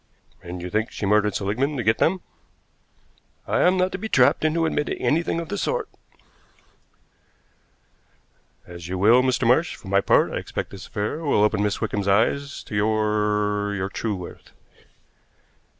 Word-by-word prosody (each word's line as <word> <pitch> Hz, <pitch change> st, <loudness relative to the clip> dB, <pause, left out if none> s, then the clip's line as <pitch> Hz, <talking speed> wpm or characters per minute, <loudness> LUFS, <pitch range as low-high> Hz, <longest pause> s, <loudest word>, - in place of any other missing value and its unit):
"And 90 Hz, 0 st, -7 dB
you 90 Hz, -, -6 dB
think 110 Hz, +1 st, 0 dB
she -, -, -5 dB
murdered 105 Hz, +1 st, +2 dB
Seligmann 125 Hz, +9 st, -1 dB
to 125 Hz, -, -2 dB
get 110 Hz, +1 st, +2 dB
them?" 185 Hz, +2 st, +2 dB, 1.2 s
"I -, -, 0 dB
am 185 Hz, +1 st, +4 dB
not 185 Hz, 0 st, +1 dB
to 185 Hz, -, -5 dB
be 220 Hz, -, -5 dB
trapped -, -, +3 dB
into 160 Hz, +1 st, +1 dB
admitting 150 Hz, -2 st, -1 dB
anything 165 Hz, +2 st, 0 dB
of 170 Hz, -, -6 dB
the 100 Hz, -, -3 dB
sort." -, -, -1 dB, 2.8 s
"As 85 Hz, -1 st, -10 dB
you 95 Hz, +1 st, -3 dB
will, 110 Hz, +7 st, +5 dB
Mr. 130 Hz, -1 st, 0 dB
Marsh. 130 Hz, +9 st, +2 dB
For 95 Hz, -, -12 dB
my 100 Hz, 0 st, +3 dB
part, -, -, +3 dB
I -, -, -3 dB
expect -, -, -5 dB
this 100 Hz, -, -10 dB
affair 105 Hz, +9 st, -3 dB
will 145 Hz, -10 st, +2 dB
open 105 Hz, -1 st, +2 dB
Miss 105 Hz, 0 st, -1 dB
Wickham's 105 Hz, -3 st, -2 dB
eyes 140 Hz, +8 st, +1 dB
to -, -, -11 dB
your 105 Hz, -1 st, 0 dB
your 95 Hz, -1 st, -3 dB
true 105 Hz, +1 st, -3 dB
worth." 90 Hz, -2 st, -10 dB
105 Hz, 165 wpm, -23 LUFS, 100-140 Hz, 2.8 s, will